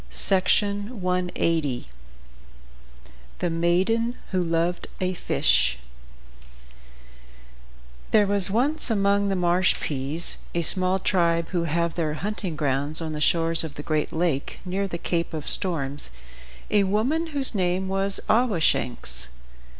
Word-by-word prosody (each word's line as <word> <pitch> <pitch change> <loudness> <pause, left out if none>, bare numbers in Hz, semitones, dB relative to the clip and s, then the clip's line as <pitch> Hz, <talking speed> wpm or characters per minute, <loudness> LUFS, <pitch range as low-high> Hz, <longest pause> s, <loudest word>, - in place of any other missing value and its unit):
THE 180 - +1 1.7
MAIDEN 190 +8 +1 0.2
WHO 185 -2 +1
LOVED 170 +1 -1
A 185 0 -1
FISH 65 - +2 2.3
There 210 -1 +4
was 200 -2 +2
once 275 +9 +2
among 200 -1 +2
the 195 - 0
Marshpees, 170 -4 0 0.2
a 170 - +1
small 185 +3 +3
tribe 170 -3 +1
who 170 -2 -1
have 170 +1 -1
their 155 -3 -2
hunting 190 -1 -4
grounds 145 +1 0
on 160 -2 -4
the 150 - -5
shores 165 +1 +2
of 155 -3 -7
the 145 - -7
Great 155 -1 -1
Lake, 160 -4 -1
near 195 +2 -2
the 170 - -5
Cape 170 -1 -2
of 155 - -6
Storms, 145 - +2 0.6
a 205 -1 +4
woman 250 - 0
whose 280 -5 +1
name 185 -1 0
was 195 +1 -1
Awashanks. 160 - +1
180 Hz, 115 wpm, -24 LUFS, 160-200 Hz, 2.3 s, There